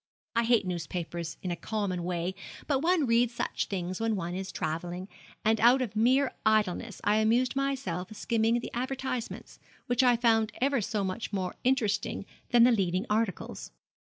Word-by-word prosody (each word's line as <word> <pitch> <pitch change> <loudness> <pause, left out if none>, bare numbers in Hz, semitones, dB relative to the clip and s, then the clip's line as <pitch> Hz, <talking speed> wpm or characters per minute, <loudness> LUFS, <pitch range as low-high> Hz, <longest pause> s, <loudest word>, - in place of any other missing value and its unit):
I 235 0 +3
hate 230 -4 +3
newspapers 170 -1 -4
in 180 - -2
a - - -1
common 195 -2 -2
way, 175 +1 -2 0.3
but 280 -3 +1
one 330 0 +2
reads 235 0 +2
such - - -2
things 185 -2 -3
when 225 -1 +1
one 175 -2 -3
is 190 +1 -4
travelling, 175 +4 -3 0.4
and 220 0 +3
out 245 +3 +6
of 245 -5 -3
mere 255 +5 +3
idleness 215 0 +1
I 210 +1 +3
amused 235 +4 +2
myself 265 -11 -2
skimming 230 +2 +1
the - - -7
advertisements, 255 -1 -4 0.3
which 245 +1 +2
I 250 -2 +5
found 225 -2 +2
ever 275 -1 +2
so 210 0 -1
much 190 +4 -3
more 185 -3 -2
interesting 220 -6 0 0.2
than 240 -1 +6
the 250 - +6
leading 190 -2 +1
articles. 205 - -2
220 Hz, 165 wpm, -29 LUFS, 185-245 Hz, 0.4 s, out